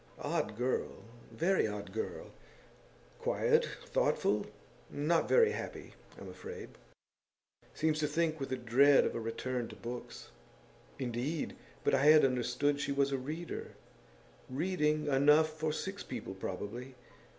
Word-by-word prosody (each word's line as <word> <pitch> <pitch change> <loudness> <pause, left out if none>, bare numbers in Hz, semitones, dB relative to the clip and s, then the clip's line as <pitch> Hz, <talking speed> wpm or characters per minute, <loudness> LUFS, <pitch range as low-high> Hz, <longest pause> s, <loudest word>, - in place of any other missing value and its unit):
Odd 110 0 -1
girl; 125 +2 -2 0.3
very 185 -4 +2
odd 105 -2 -6
girl! 110 - -4 0.9
Quiet, - - +2 0.2
thoughtful 105 0 +1 0.4
not 155 +3 +1
very 460 -2 +6
happy, - - -6 0.3
I'm - - -9
afraid. 465 +1 -8 1.1
Seems 155 0 +1
to 150 - +1
think 160 +1 0
with 130 -2 -4
dread 135 +4 +6
of - - -1
a - - -3
return 120 +2 -3
to - - -10
books.' 120 +1 -7 0.7
'Indeed! 130 +5 -2 0.3
But - - +2
I 140 - +3
had 155 -1 +8
understood 125 +3 +1
that - - -4
she 140 - -1
was 140 0 +2
a 135 - 0
reader.' 155 +6 -5 0.8
'Reading 150 +1 0
enough 150 +3 +4
for 155 0 -1
six 195 +6 -4
people, - - -6
probably. 105 +7 -6
140 Hz, 130 wpm, -33 LUFS, 125-155 Hz, 1.1 s, had